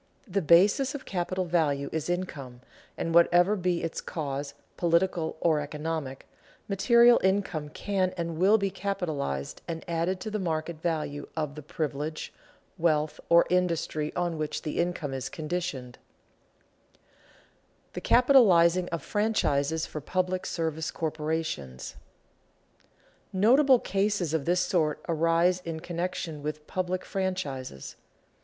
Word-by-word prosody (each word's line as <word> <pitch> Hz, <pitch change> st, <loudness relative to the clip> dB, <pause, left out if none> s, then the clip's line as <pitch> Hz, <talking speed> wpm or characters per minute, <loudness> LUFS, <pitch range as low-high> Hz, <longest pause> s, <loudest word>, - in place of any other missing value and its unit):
The 195 Hz, 0 st, 0 dB
basis 200 Hz, -, +4 dB
of 280 Hz, -, -7 dB
capital 185 Hz, 0 st, -2 dB
value 150 Hz, -5 st, +1 dB
is 160 Hz, +1 st, -3 dB
income, 140 Hz, -9 st, -4 dB, 0.4 s
and 165 Hz, -, -2 dB
whatever 175 Hz, +4 st, +5 dB
be 180 Hz, -3 st, -1 dB
its 165 Hz, -, -3 dB
cause, 140 Hz, -3 st, -4 dB, 0.2 s
political 170 Hz, -1 st, +1 dB
or 160 Hz, -3 st, +2 dB
economic, 150 Hz, -2 st, -4 dB, 0.4 s
material 235 Hz, +4 st, +5 dB
income 190 Hz, -6 st, 0 dB
can 190 Hz, +2 st, -1 dB
and 170 Hz, -1 st, -3 dB
will 200 Hz, +4 st, +5 dB
be 200 Hz, -2 st, -1 dB
capitalized 165 Hz, -, -3 dB
and 165 Hz, -1 st, -5 dB
added 170 Hz, +2 st, -1 dB
to 215 Hz, -, -5 dB
the 215 Hz, -, -2 dB
market 160 Hz, -2 st, -3 dB
value 150 Hz, -4 st, -2 dB
of 150 Hz, -3 st, -2 dB
the 150 Hz, -, -8 dB
privilege, 150 Hz, 0 st, -4 dB, 0.5 s
wealth, 155 Hz, -2 st, +1 dB
or 170 Hz, 0 st, +6 dB
industry 165 Hz, -4 st, 0 dB
on 175 Hz, -2 st, -1 dB
which 155 Hz, -1 st, -3 dB
the 155 Hz, -, -3 dB
income 170 Hz, -5 st, -1 dB
is 130 Hz, -1 st, -4 dB
conditioned. 155 Hz, -6 st, -4 dB
[Sidenote: -, -, -35 dB
The -, -, -5 dB
capitalizing 185 Hz, -9 st, +5 dB
of 165 Hz, -4 st, -4 dB
franchises 160 Hz, -8 st, 0 dB
for 150 Hz, -, -7 dB
public 185 Hz, +4 st, -1 dB
service 160 Hz, -1 st, -2 dB
corporations] 155 Hz, -, -3 dB, 1.4 s
Notable 255 Hz, +8 st, +5 dB
cases 195 Hz, -6 st, -1 dB
of 155 Hz, -4 st, 0 dB
this 180 Hz, +1 st, +2 dB
sort 155 Hz, -5 st, 0 dB
arise 165 Hz, +2 st, +2 dB
in 165 Hz, -1 st, -4 dB
connection 170 Hz, -2 st, -4 dB
with 150 Hz, +1 st, -5 dB
public 185 Hz, +1 st, -2 dB
franchises. 145 Hz, -, -4 dB
170 Hz, 125 wpm, -28 LUFS, 155-185 Hz, 1.4 s, or